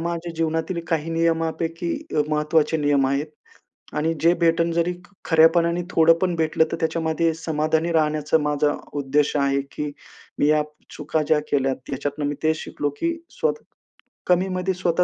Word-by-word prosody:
माझ्या 170 0 -3
जीवनातील 165 +2 -1
काही 165 0 -1
नियमांपैकी 165 +1 -1 0.2
अ, 150 - +4
महत्त्वाचे 150 +1 +2
नियम 145 -3 +2
आहेत. 140 +2 0 0.7
आणि 160 +2 +1
जे 170 +1 +6
भेटलं 165 0 +3
जरी 170 +1 +1 0.3
खऱ्यापणाने 170 +1 +4
थोडं 165 -1 +5
पण 180 -1 0
भेटलं, 160 0 +2
तर - - 0
त्याच्यामध्ये 160 0 0
समाधानी 160 +1 0
राहण्याचा 155 -1 +2
माझा 150 -1 +1 0.3
उद्देश 145 +2 +1
आहे, 140 -1 +2
की 150 0 -3 0.5
मी 145 - +3
या 150 0 +4 0.3
चुका 155 - -1
ज्या 155 -1 +4
केल्यात 135 -2 -1
याच्यातून 145 +2 -2
मी 145 - -2
तेच 155 0 +2
शिकलो, 145 - -3
की 335 0 +1 0.2
स्वतः 475 -1 -1 0.7
कमीमध्ये 185 +1 +1
स्वतः 180 -1 +1
160 Hz, 150 wpm, -23 LUFS, 150-170 Hz, 0.7 s, जे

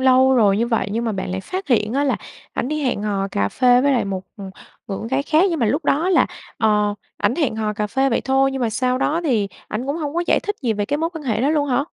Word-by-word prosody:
lâu 260 0 +5
rồi 205 -5 +4
như 230 - +1
vậy 225 -3 0
nhưng 230 +2 -1
mà 225 - -1
bạn 190 -2 -4
lại 190 +1 -3
phát 375 - -5
hiện 220 -4 +2
á 280 +3 +1
là 275 - +1 0.4
ảnh 250 - -2
đi 305 +1 -2
hẹn 250 -6 -1
hò 200 -2 -1
cà 100 - 0
phê 245 - +4
với 280 +2 +3
lại 250 - +1
một, 190 -2 -3
ừm, 195 -2 -8 0.4
người 195 - -4
con 225 - -6
gái 265 +2 0
khác, 310 +4 +3
nhưng 330 - -1
mà 230 - +3
lúc 290 +9 0
đó 310 +5 +2
là, 365 -3 +4 0.3
ờ, 210 -2 +2 0.2
ảnh - - +1
hẹn 275 -9 0
hò 215 -1 -1
cà 210 0 -2
phê 265 +6 +1
vậy 235 - +1
thôi, 270 0 +2
nhưng 270 - -3
mà 230 - +1
sau 255 +3 0
đó 315 +5 +1
thì 225 -9 +1 0.2
ảnh 235 +5 -4
cũng 285 +2 -1
hông 300 -2 -4
có 345 - +1
giải - - +3
thích 415 0 -3
gì 235 -3 +1
về 205 -1 -1
cái 285 +5 0
mối 325 +2 -1
quan 325 -3 -7
hệ 220 -4 0
đó 275 +4 +2
luôn 295 -2 +1
hả? 265 +2 +1
250 Hz, 295 wpm, -21 LUFS, 215-285 Hz, 0.4 s, lâu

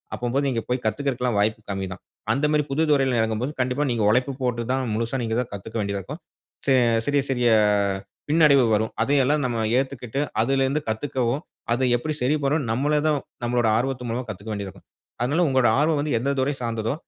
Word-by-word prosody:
அப்பம்போது 125 +4 -1
நீங்க 115 -3 -1
போய் 125 -1 -1
கத்துக்குறதுக்கெல்லாம், 125 -1 -1
வாய்ப்பு 110 +2 +1
கம்மி 95 -1 -3
தான். - - -13 0.3
அந்த 140 +2 +1
மாதிரி 150 -1 +2
புது 150 +4 0
துறையில 135 -4 +3
இறங்கும் 110 0 -1
போது, 140 - -2
கண்டிப்பா 130 +3 0
நீங்க 115 -3 0
உழைப்பு 125 +4 +2
போட்டு 120 -2 0
தான் 130 0 0
முழுசா 115 +3 -1
நீங்க 110 0 -1
தான் 125 - -6
கத்துக்க 105 +3 -8
வேண்டியதா 100 -1 -2
இருக்கும். - - -8 0.4
சி 135 - +4 0.3
சிறிய 145 -1 +2
சிறிய 125 -2 +2 0.8
பின்னடைவு 150 -4 +5
வரும். 110 +1 -1
அதையெல்லாம் 145 +3 +2
நம்ம 120 -2 -1 0.2
ஏத்துக்கிட்டு 135 -1 -4 0.2
அதிலருந்து 135 +4 +1
கத்துக்கவும், 130 +3 -1 0.3
அத 125 +2 +2
எப்படி 155 +5 -3
சரிபண்ணணும்னு 140 -1 +1
நம்மளே 145 +5 +1
தான் 150 -2 +2 0.3
நம்மளோட 120 -1 +1
ஆர்வத்து 125 0 -2
மூலமா, 125 +3 -2
கத்துக்க 105 +2 -7
வேண்டி 100 -1 -4
இருக்கும். 95 - -13 0.4
அதனால 145 +8 +2
உங்களோட 130 -3 +3
ஆர்வம் 155 -1 +2
வந்து 145 -2 -1
எந்த 135 +4 -1
துறை 140 +2 +1
சார்ந்ததோ, 115 0 -2
125 Hz, 185 wpm, -24 LUFS, 115-140 Hz, 0.8 s, பின்னடைவு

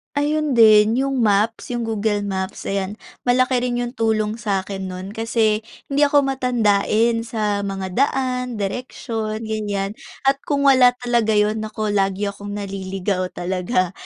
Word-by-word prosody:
Ayun 295 -1 0
din, 220 -1 +6
yung 270 0 0
maps, 215 0 +1
yung 240 - -2
Google 215 -2 -1
Maps, 190 -1 -4
ayan. 195 +1 -2 0.3
Malaki 255 0 +3
rin 245 0 -1
yung 240 - -4
tulong 220 -2 0
sa'kin 195 -2 -2
no'n 185 +1 -7
kasi 225 -1 +1 0.3
hindi 290 +1 +4
ako 285 0 +4
matandain 230 -3 +2
sa 210 -3 -1
mga 190 -1 -4
daan, 250 0 0
direksyon, 220 0 -4
ganyan. 205 -2 -2 0.3
At 270 0 +3
kung 285 -1 +1
wala 255 -3 +6
talaga 235 -3 +2
'yon, 210 +1 +2
naku, 215 -1 -3
lagi 200 0 0
akong 205 0 -7
naliligaw 195 -1 -3
talaga. 185 +1 -1
215 Hz, 140 wpm, -21 LUFS, 200-245 Hz, 0.3 s, din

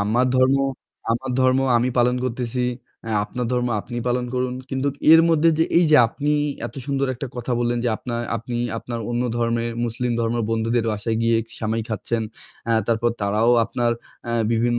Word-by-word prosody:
আমার 115 +5 +2
ধর্ম, 130 +1 +4 0.6
আমার 130 +3 -3
ধর্ম 130 0 +4 0.2
আমি 120 +2 +2
পালন 125 +1 +3
করতেছি। 125 0 -2 0.5
আ - - -3
আপনার 125 +2 -4
ধর্ম 125 0 +1
আপনি 120 +2 -8
পালন 125 0 0
করুন। 125 0 -1 0.2
কিন্তু 135 +1 0 0.2
এর 165 - +9
মধ্যে, 165 0 +4
যে 160 - +4
এইযে 155 -3 +5
আপনি 145 +5 -2 0.4
এত - - -11
সুন্দর 140 -1 0
একটা 130 +3 -5
কথা 120 +1 -3
বললেন, 120 0 0
যে - - +2
আপনা 120 - -6 0.2
আপনি 120 +2 -5 0.2
আপনার 120 0 -5
অন্য 120 +1 0
ধর্মের 115 0 0
মুসলিম 120 +1 -2
ধর্মের 115 0 0
বন্ধুদের 115 +1 0
বাসায় 110 +2 -2
গিয়ে 115 0 +3 0.2
সেমাই 110 0 -1
খাচ্ছেন। 115 +2 -2 0.4
অ্যা 115 - +2
তারপর 115 0 +1
তারাও 105 +4 +2
আপনার 120 +1 0 0.3
অ্যা 120 - -1 0.2
বিভিন্ন 120 +1 +1
120 Hz, 175 wpm, -22 LUFS, 115-125 Hz, 0.6 s, এর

